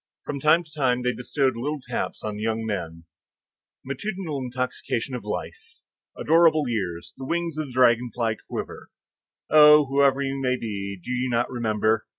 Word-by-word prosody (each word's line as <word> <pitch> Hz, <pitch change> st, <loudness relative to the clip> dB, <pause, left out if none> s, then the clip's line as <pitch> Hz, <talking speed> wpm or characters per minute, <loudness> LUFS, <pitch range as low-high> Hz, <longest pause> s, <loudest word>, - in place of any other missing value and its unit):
From 140 Hz, -, -4 dB
time 155 Hz, +5 st, +4 dB
to 155 Hz, -2 st, -21 dB
time 125 Hz, -4 st, +1 dB
they 125 Hz, 0 st, +1 dB
bestowed 130 Hz, +1 st, 0 dB
little 145 Hz, +6 st, -3 dB
taps 125 Hz, -2 st, -4 dB
on 105 Hz, -1 st, -3 dB
the -, -, -6 dB
young 110 Hz, 0 st, -1 dB
men. 85 Hz, -6 st, -4 dB, 0.8 s
Matutinal 160 Hz, +2 st, -4 dB
intoxication 130 Hz, -1 st, -3 dB
of 125 Hz, -, -4 dB
life! 105 Hz, -, -6 dB, 0.4 s
adorable 160 Hz, -2 st, +4 dB
years! 95 Hz, -8 st, -3 dB
the 135 Hz, -, -7 dB
wings 170 Hz, -1 st, -1 dB
of 155 Hz, -, -2 dB
the 130 Hz, -, -11 dB
dragonfly 120 Hz, -2 st, +2 dB
quiver. -, -, -6 dB, 0.6 s
Oh, 150 Hz, 0 st, +8 dB
whoever 140 Hz, 0 st, +2 dB
you 135 Hz, 0 st, -3 dB
may 130 Hz, -1 st, +1 dB
be, 100 Hz, -4 st, -5 dB
do 105 Hz, -, -7 dB
you 125 Hz, +1 st, -1 dB
not 120 Hz, +1 st, 0 dB
remember? 110 Hz, -2 st, 0 dB
125 Hz, 165 wpm, -25 LUFS, 115-145 Hz, 0.8 s, Oh